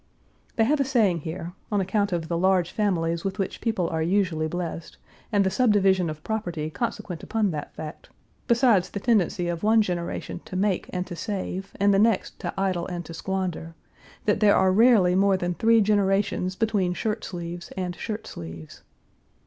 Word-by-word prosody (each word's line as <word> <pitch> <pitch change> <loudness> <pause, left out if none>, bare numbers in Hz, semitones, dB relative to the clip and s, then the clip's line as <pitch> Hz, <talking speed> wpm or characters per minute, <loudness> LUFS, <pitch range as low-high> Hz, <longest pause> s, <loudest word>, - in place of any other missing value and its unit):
They 225 - +3
have 290 +6 +2
a - - +4
saying 225 - +2
here 165 +2 -6 0.2
on 205 - +2
account 200 +2 0
of 170 -2 -2
the 170 - -1
large 180 0 +2
families 170 -5 0
with 195 0 -3
which 195 - -3
people 220 -7 0
are 160 -1 -1
usually 170 -2 +1
blessed, 170 0 -5 0.3
and 205 -2 +3
the 190 - +1
subdivision 195 -7 +3
of 155 0 -7
property 175 -8 -3
consequent 180 -4 -4
upon 220 -3 0
that 150 -2 -5
fact, 155 0 -8 0.4
besides 235 -6 +4
the 200 - -4
tendency 195 -5 +1
of 170 -1 -3
one 220 +1 +4
generation 175 -1 -4
to - - -8
make 190 0 0
and 180 0 -2
to 180 - -7
save, 190 0 -4
and 200 0 +4
the 195 - +4
next 220 -2 +1
to - - -3
idle 185 -3 0
and 175 -2 -5
to 165 - -8
squander, 180 -2 -3 0.5
that 210 - +2
there 210 -2 +5
are 190 0 +4
rarely 210 -3 +5
more 195 +1 +3
than 175 -1 -2
three 225 +4 +4
generations 195 -2 +1
between 200 -5 0
shirt 220 +2 -2
sleeves 175 -1 -6
and 180 -1 -3
shirt 215 +2 -5
sleeves. 80 -2 -9
190 Hz, 180 wpm, -25 LUFS, 175-210 Hz, 0.5 s, there